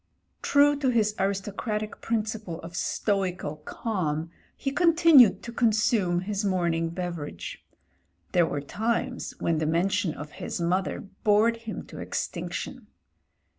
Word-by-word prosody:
True 290 +1 +5
to 270 -3 +2
his 220 -4 +2
aristocratic 205 +2 -2
principle 215 -6 -2
of 170 +2 -9
stoical 185 -7 -1
calm 160 -2 -3 0.3
he 275 - -2
continued 330 - +6
to 235 - -6
consume 215 -6 +2
his 200 +2 -2
morning 170 -4 +1
beverage. 170 -3 -5 0.7
There 175 -2 +4
were 145 -2 -2
.times 230 - -2
when 165 -2 0
the 155 - 0
mention 175 +2 +1
of 150 0 -8
his - - -5
mother 180 +3 0 0.2
bored 220 +2 +4
him 230 -1 -7
to - - -11
extinc - - -4
tion. - - -5
200 Hz, 130 wpm, -27 LUFS, 170-225 Hz, 0.7 s, continued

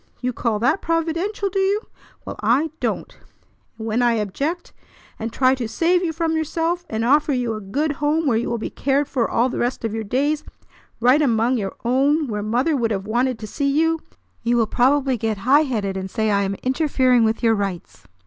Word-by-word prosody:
You 250 0 -2
call 230 -2 -1
that 245 - +1
providential, 335 +5 -1
do 390 +1 -1
you? 395 +2 +1 0.4
Well, - - -6
I 255 +9 +2
don't! - - -3 0.6
And 220 - -6
when 225 +2 0
I 240 -1 +3
object, 275 - -3 0.5
and 225 +1 -4
try 255 +2 +3
to 250 -4 -3
save 350 +9 +1
you 335 - 0
from 325 0 -1
yourself, 330 +2 -1
and 220 +1 -1
offer 290 +3 +3
you 245 -3 -1
a 215 - -5
good 280 +11 -1
home 295 +3 0
where 255 -5 +2
you 230 - -1
will 235 - -1
be 220 - -5
cared 275 +1 0
for 250 -6 -1
all 235 +2 +2
the 255 - -4
rest 240 -1 -1
of 220 - -2
your 225 0 -3
days, 290 +8 0 0.6
right 255 +6 +4
among 240 -2 +2
your 195 -2 -4
own, 280 +5 +2
where 210 -5 -3
mother 245 +9 +1
would 235 -4 0
have 195 -3 -2
wanted 245 +3 0
to 220 - -7
see 280 +6 -1
you, 325 +3 +2 0.4
you 240 +1 +1
will 230 - +3
probably 265 +3 +2
get 220 -1 -2
high 260 +9 +4
headed, 210 -7 -2
and 190 0 -4
say 220 +1 0
I 200 0 +2
am 195 0 -1
interfering 255 -3 +2
with 225 +2 0
your 225 -1 +4
rights. 195 -4 -4
255 Hz, 210 wpm, -21 LUFS, 225-300 Hz, 0.6 s, right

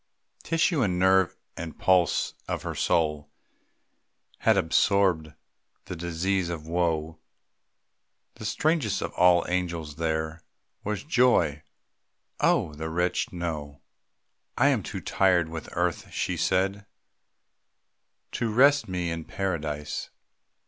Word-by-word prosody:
Tissue 165 -2 +1
and 95 -6 +1
nerve 95 0 +3 0.2
and 80 -1 -7
pulse 90 -3 +2
of - - -3
her - - -3
soul 75 -3 0 1.1
Had 110 -2 +3
absorbed 90 -2 +2 0.5
the 90 - -6
disease 85 +2 -1
of 80 -3 -5
woe. 80 -2 -1 1.1
The 110 - -10
strangest 145 - 0
of - - -5
all 90 -1 +5
the - - -6
angels 85 -5 -2
there 80 0 -2 0.4
Was 105 -1 -3
Joy. 125 - +3 0.8
(Oh, 75 - +2
the 80 +2 -5
wretched 90 +2 0
know!) 75 -5 -5 0.8
"I - - +5
am - - +2
too - - -6
tired 90 -4 +2
with 80 -1 -7
earth," 90 -1 -1
she - - -2
said, 95 +2 0 1.4
"To 115 -2 -2
rest 140 +5 +5
me 90 -2 -2
in 80 -1 -4
Paradise. 75 -6 -3
85 Hz, 115 wpm, -27 LUFS, 80-95 Hz, 1.4 s, all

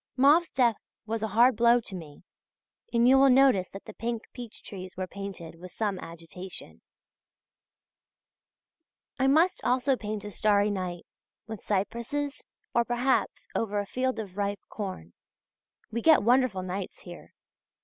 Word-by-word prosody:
Mauve's 295 +6 +5
death 240 -4 +2 0.3
was 225 0 -3
a 220 - 0
hard 235 +4 +4
blow 235 +2 +5
to 220 - -9
me, 160 -5 -9 0.7
and 235 0 +4
you 265 +1 +7
will 275 0 +6
notice 255 -8 +5
that 195 - -10
the - - -9
pink 230 -1 -3
peach 240 -3 -9
trees 185 -2 -9
were 185 - -2
painted 190 -4 -7
with 180 +1 -10
some 205 -4 -2
agitation. 170 +3 -10 2.4
I 265 - +3
must 320 +7 +3
also 255 +2 +2
paint 210 -3 -5
a 210 - -6
starry 205 0 +2
night, 180 -3 -4 0.4
with 220 -2 -7
cypresses, 235 +8 -2 0.3
or, 235 - +3
perhaps, 245 +2 0
over 210 -2 -1
a 205 - -2
field 255 +5 -1
of 200 -4 -7
ripe 200 0 -1
corn. 185 - -6 0.8
We 235 - -2
get 315 -6 +6
wonderful 240 -5 +3
nights 185 +1 -5
here. 175 -1 -12
215 Hz, 150 wpm, -28 LUFS, 190-250 Hz, 2.4 s, you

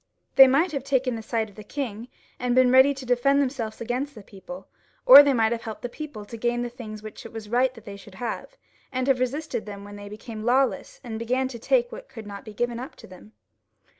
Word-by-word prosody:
They 270 - +10
might 290 +7 +2
have 280 -4 -3
taken 265 -2 0
the 225 - -5
side 220 0 -2
of 205 - -17
the 215 - -10
king, 230 -1 -5 0.3
and 250 -1 0
been 255 -1 +5
ready 260 +2 +7
to 270 -2 -7
defend 250 +3 +3
him 230 -5 -4
against 250 +5 -3
the 215 - -11
people, 200 +8 -11 0.4
or - - +12
they 285 -1 +3
might 225 -3 +2
have 235 -1 -2
helped 220 -1 -8
the 245 - -3
people 245 -6 -8
to 230 - -9
gain 240 +1 0
the 240 - -3
things 215 -4 -9
which 215 - -9
it 230 - -10
was 220 -2 -8
right 250 +2 +2
that 225 - -14
they 200 -1 -8
should 200 -1 -14
have, 235 +1 -5 0.3
and 255 -1 -1
have 265 -2 +2
resisted 260 -1 -2
them 200 -1 -8
when 205 0 -10
they 205 0 -9
became 215 +1 -8
lawless, 255 +3 +1
and 225 -3 -6
began 255 +3 0
to 240 -3 -8
take 485 - +1
what - - -10
could 225 -3 -10
not 200 -1 -8
be 215 - -10
given 240 0 -1
up 255 - -8
to - - -14
them. 185 +4 -15
240 Hz, 245 wpm, -25 LUFS, 220-265 Hz, 0.4 s, or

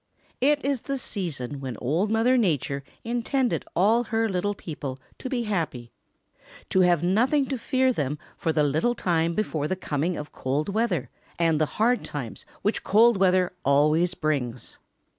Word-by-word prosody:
It 290 +1 +3
is 275 -4 0
the 275 -1 -3
season 150 - -4
when 130 -4 -5
Old 165 - 0
Mother 225 +4 +3
Nature 145 - 0 0.2
intended 240 +2 0
all 225 +6 +3
her 225 0 0
little 205 +1 -1
people 145 -7 -6 0.2
to 260 - -5
be 245 -2 -1
happy, 160 - -3 0.8
to 190 - +3
have 175 -3 +4
nothing 245 +10 +3
to 265 -3 -2
worry 260 0 +4
them 150 - -2 0.2
for 165 - -1
the 155 -1 +2
little 155 - +1
time 170 -3 0
before 155 -8 -1
the 185 - -1
coming 170 -1 -2
of 150 - -7
cold 140 +6 -2
weather 215 -3 0 0.3
and 165 -2 +2
the 155 - +3
hard 240 +3 +2
times 130 -7 -6 0.2
which 210 - 0
cold 225 +2 +5
weather 185 -1 +3
always 155 +5 +3
brings. 130 -6 -3
180 Hz, 160 wpm, -26 LUFS, 150-230 Hz, 0.8 s, cold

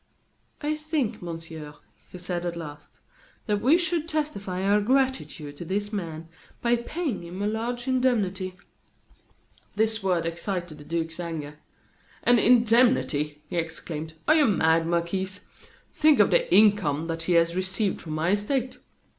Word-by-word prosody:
"I 300 0 0
think, 305 -7 -2
Monsieur," 165 -3 -7 0.4
he - - -8
said, 175 -1 -4
at 175 -1 -3
last, 150 -3 -9 0.5
"that 210 -2 0
we 285 +7 +5
should 340 -2 -1
testify 200 - -2
our 205 +1 +3
gratitude 255 - 0
to - - -6
this 205 +4 -2
man 165 -5 -5 0.3
by 240 0 +2
paying 250 - -3
him 175 +2 -8
a 205 - -1
large 235 +3 -2
indemnity." 205 -8 0 1.2
This 220 +1 +1
word 180 -3 +1
excited 170 -1 -4
the - - -10
duke's 165 0 -3
anger. 155 -3 -5 0.6
"An 245 -1 +5
indemnity!" 230 - +3
he 175 - -4
exclaimed. 160 -1 -4
"Are 310 - +7
you 310 -3 +5
mad, 165 -5 +3
Marquis? 170 +3 -1 0.6
Think 310 -1 +4
of - - +5
the - - +3
income 195 -8 +4
that 165 0 -3
he - - +4
has 170 0 +3
received 190 +2 -1
from 155 - -6
my 160 +3 +1
estate. 245 +5 -1
190 Hz, 145 wpm, -26 LUFS, 165-240 Hz, 1.2 s, Are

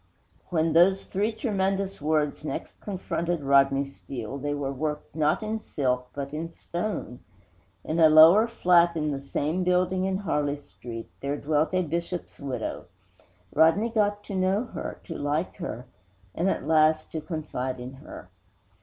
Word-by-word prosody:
III - - -38
When 160 -2 +1
those 190 +4 +5
three 205 +4 0
tremendous 195 - -1
words 150 -1 0
next 155 - -5
confronted 175 -4 -2
Rodney 140 0 +4
Steele, 135 -2 -7
they 145 +1 -2
were 140 -1 -3
worked, 150 +2 -4
not 155 +5 +1
in 220 +1 -2
silk, 125 -9 -1
but 140 0 -5
in 160 +2 -3
stone! 170 - -5 0.6
In 160 +2 -2
a 160 -1 +8
lower 165 +8 +8
flat, 175 -6 +4
in 150 -1 0
the 135 -1 -3
same 155 +5 -1
building 180 +1 +2
in 190 0 0
Harley 150 -7 -1
Street, 120 -5 -9
there 140 +1 -2
dwelt 155 +4 0
a 185 - +2
Bishop's 170 +2 -4
widow. 130 -5 -4 0.7
Rodney 165 +9 +4
got 205 -2 +1
to - - -7
know 190 +4 +2
her, - - -5
to 165 - -7
like 150 +4 -2
her, 130 - -5 0.5
and, 180 +4 +1
at 140 - -2
last, 155 0 +3
to 160 - -3
confide 130 -6 -4
in 125 +2 -7
her. 135 - -11
160 Hz, 160 wpm, -27 LUFS, 145-185 Hz, 0.7 s, a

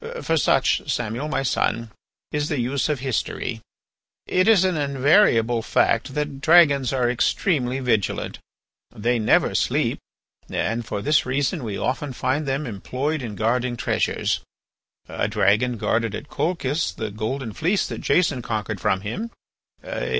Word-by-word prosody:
For 165 - +1
such, 135 -1 +2
Samuel, 120 +4 -2
my 150 -3 -1
son, 115 -3 0 0.4
is 150 0 -1
the 150 - -1
use 135 +5 0
of 145 -4 -1
history. 125 -3 -2 0.6
"It 185 +2 +2
is 215 -5 +6
an 185 -2 +1
invariable 140 - +3
fact 115 +3 +1
that 150 -2 -3
dragons 145 -5 +5
are 130 -2 +1
extremely 130 - +1
vigilant. 115 -6 -1 0.5
They 120 +3 0
never 110 - +3
sleep, - - 0 0.5
and 115 +2 -1
for 105 -2 -4
this 150 -3 +2
reason 140 +3 -1
we 105 -4 -4
often 130 +2 -2
find 135 +4 -1
them 135 +3 -1
employed 130 +7 -3
in 110 -4 -5
guarding 120 +3 0
treasures. - - 0 0.7
A - - -2
dragon 105 +4 +2
guarded 115 0 0
at 145 - -8
Colchis 160 -3 -1
the 110 -2 -4
golden 110 +3 -4
fleece 180 - +1
that - - -6
Jason 155 -8 +2
conquered 105 -4 -3
from 95 - +1
him. 180 - -4
130 Hz, 145 wpm, -23 LUFS, 115-150 Hz, 0.7 s, is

